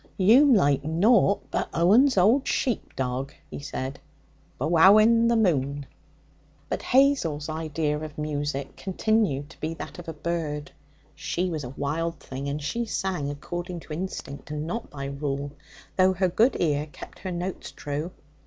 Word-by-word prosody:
'You'm 245 +8 +6
like 145 -7 +3
nought 200 +6 +3
but - - -1
Owen's 215 - +5
old 225 +9 +4
sheep 245 -5 -1
dog,' 130 +1 -3 0.2
he - - -6
said, 135 -1 -5 0.6
'wowing 215 +7 +6
the 235 - +3
moon!' 145 - +1 0.8
But - - -2
Hazel's 250 - +2
idea 155 -1 -2
of 155 -1 -8
music 145 -2 -3
continued 190 -7 0
to - - -16
be 160 +1 -3
that - - -8
of 175 - -10
a - - -4
bird. 150 -2 -3 0.4
She 180 +1 -2
was 155 -3 -3
a 125 - -6
wild 155 +5 -3
thing, 135 +2 -6
and 145 +2 -2
she 235 +11 -2
sang 185 -9 -2
according 175 +4 -5
to 155 - -8
instinct, 155 -5 -6
and 150 0 -3
not 225 +8 -4
by 140 -1 -6
rule, 140 0 -3 0.5
though 185 0 +5
her 185 0 +1
good 230 +9 +3
ear 150 -2 +1
kept - - -11
her 185 - -5
notes 180 +2 -4
true. 150 +3 -4
160 Hz, 155 wpm, -26 LUFS, 145-190 Hz, 0.8 s, You'm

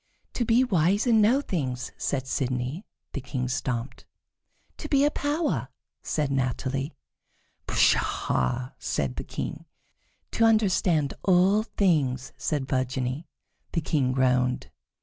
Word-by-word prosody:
"To 240 - -1
be 235 +3 +4
wise 195 -1 +2
and 225 -3 +5
know 240 +7 +4
things," 130 - -3
said 135 -2 -2
Sidonie. 130 - -2 0.3
The 140 - -3
King 125 -1 -3
stamped. 125 0 -3 0.7
"To - - -7
be 280 0 +4
a 295 - +3
power," 300 +3 -1 0.3
said 150 -3 -1
Natalie. 135 +2 -1 0.7
"Pshaw!" 120 - +1
said 65 -2 -2
the - - -3
King. - - -5 0.7
"To 230 - +1
understand 185 -9 +3
all 190 +3 +4
things," 150 - 0
said 145 -4 -2
Virginie. 130 +3 -2 0.5
The 165 - +1
King 145 -4 +1
groaned. 125 -1 +1
140 Hz, 120 wpm, -26 LUFS, 130-200 Hz, 0.7 s, and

